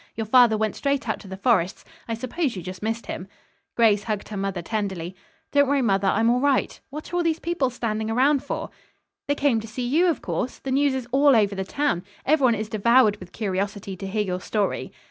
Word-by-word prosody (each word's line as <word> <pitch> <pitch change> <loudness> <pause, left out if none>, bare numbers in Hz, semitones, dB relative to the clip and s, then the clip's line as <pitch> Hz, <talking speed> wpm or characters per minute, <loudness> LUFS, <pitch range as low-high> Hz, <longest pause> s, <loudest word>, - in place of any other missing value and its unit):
Your 225 - -3
father 235 -1 +5
went 215 0 -1
straight 280 -2 -1
out 220 - -1
to 205 - -12
the 190 0 -7
Forrests. 195 -4 +1 0.2
I 230 - -2
suppose 255 +3 -2
you 180 - -6
just 185 -1 -7
missed 225 +2 -2
him." 180 - -6 0.5
Grace 215 -3 +4
hugged 215 -3 -3
her 215 - -6
mother 195 -3 -3
tenderly. 190 -3 -3 0.4
"Don't 285 -1 +4
worry, 280 -1 +2
mother. 195 -3 +2
I'm 225 +4 +2
all 245 - +2
right. 280 0 +1
What 300 +5 -8
are - - +1
all - - +2
these 330 -2 +1
people 335 -6 -1
standing 220 -3 -3
around 270 +4 +3
for?" - - -4 0.6
"They 285 - +1
came 280 -6 +2
to 220 - -8
see 245 +3 -4
you, 325 +8 +3
of 335 - 0
course. 175 +8 -3
The 270 - -5
news 275 0 +2
is 255 -2 -4
all 275 +1 +5
over 200 -3 +2
town. 235 -4 -1 0.2
Everyone 265 -5 +4
is 215 0 -3
devoured 220 0 +4
with 185 -3 -12
curiosity 195 -1 -3
to 195 +1 -6
hear 210 +2 0
your 185 -2 -3
story." 205 0 -2
225 Hz, 220 wpm, -24 LUFS, 200-270 Hz, 0.6 s, father